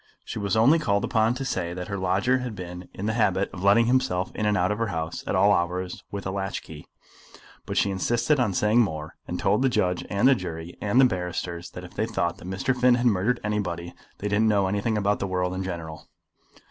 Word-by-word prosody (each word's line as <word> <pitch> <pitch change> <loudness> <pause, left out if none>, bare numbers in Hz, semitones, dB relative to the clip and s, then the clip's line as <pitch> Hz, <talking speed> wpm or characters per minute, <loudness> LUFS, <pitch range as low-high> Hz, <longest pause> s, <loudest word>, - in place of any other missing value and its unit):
She - - -5
was 100 0 0
only 135 +9 +5
called 100 -8 +1
upon 115 +1 +2
to 135 +1 -4
say 90 -8 -2
that 90 0 -5
her 100 - -3
lodger 100 +8 +2
had 125 -4 -5
been 90 -1 -8
in 100 - -6
the 110 - 0
habit 100 -4 +1
of 90 - -7
letting 100 +4 +5
himself 120 -7 +1
in 105 - 0
and 105 0 +2
out 90 +2 +2
of 105 - -2
her 115 - 0
house 80 -4 -4
at - - 0
all 100 - +5
hours 90 +1 -2
with 100 -1 -6
a 95 - -2
latch 95 0 -3
key; 75 -2 -11 0.8
but - - -3
she 100 - +2
insisted 120 +9 +1
on 110 -7 +1
saying 105 +5 +3
more, 80 -7 -3
and - - -4
told 100 +4 +2
the 135 - +3
judge 90 -7 0
and 105 +5 +3
the 135 - +7
jury 85 -5 -5
and 105 +4 +2
the 135 - +8
barristers 90 -4 -3
that 90 - -8
if 90 - -11
they 110 +2 -1
thought 85 -6 -1
that - - -11
Mr. 95 +7 -1
Finn 125 0 +4
had 120 0 -1
murdered 115 +2 +2
anybody 90 -5 -2 0.2
they 105 - -3
didn't 105 +2 +2
know 100 -2 +3
anything 105 +3 0
about 105 0 +1
the 100 - -2
world 90 -1 -1
in 95 - -3
general. 80 -4 -6
100 Hz, 235 wpm, -25 LUFS, 90-110 Hz, 0.8 s, the